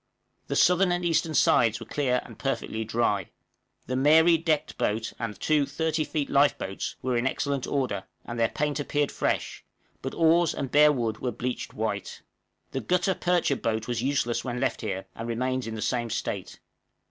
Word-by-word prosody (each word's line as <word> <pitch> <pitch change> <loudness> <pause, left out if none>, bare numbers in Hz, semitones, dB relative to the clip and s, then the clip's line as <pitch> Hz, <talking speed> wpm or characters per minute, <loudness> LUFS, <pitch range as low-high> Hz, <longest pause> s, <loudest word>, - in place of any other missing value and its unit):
The - - -2
southern 180 +1 +4
and 175 0 -1
eastern 165 -1 +1
sides 115 -5 +4
were - - -8
clear 130 -4 0
and - - -13
perfectly 125 -4 -2
dry. 110 -4 0 0.6
The 130 - -3
'Mary' 160 +5 +6
decked 160 -2 0
boat, 110 +2 -1
and 105 -4 -4
two 150 -3 +2
30 155 +2 -1
feet 150 -2 -2
lifeboats, 140 -9 +1
were 130 -1 0
in 120 +2 +1
excellent 140 0 -1
order, 125 -9 -1 0.2
and 120 0 -5
their 115 - +3
paint 150 0 -1
appeared 145 0 0
fresh, - - -2 0.4
but - - -5
oars 165 0 +4
and 135 - -4
bare 150 0 +7
wood 115 -6 -2
were 125 - -2
bleached 125 +3 -4
white. - - -3 0.5
The 135 - -3
gutta 180 - +1
percha 175 -6 +1
boat 110 -3 -2
was 120 -2 -1
useless 130 -3 0
when 125 -1 -3
left - - -1
here, 95 -4 -3
and 115 - -6
remains 130 +1 -1
in 110 - -4
the 110 - -3
same 120 -2 -1
state. - - -4
130 Hz, 180 wpm, -27 LUFS, 115-155 Hz, 0.6 s, bare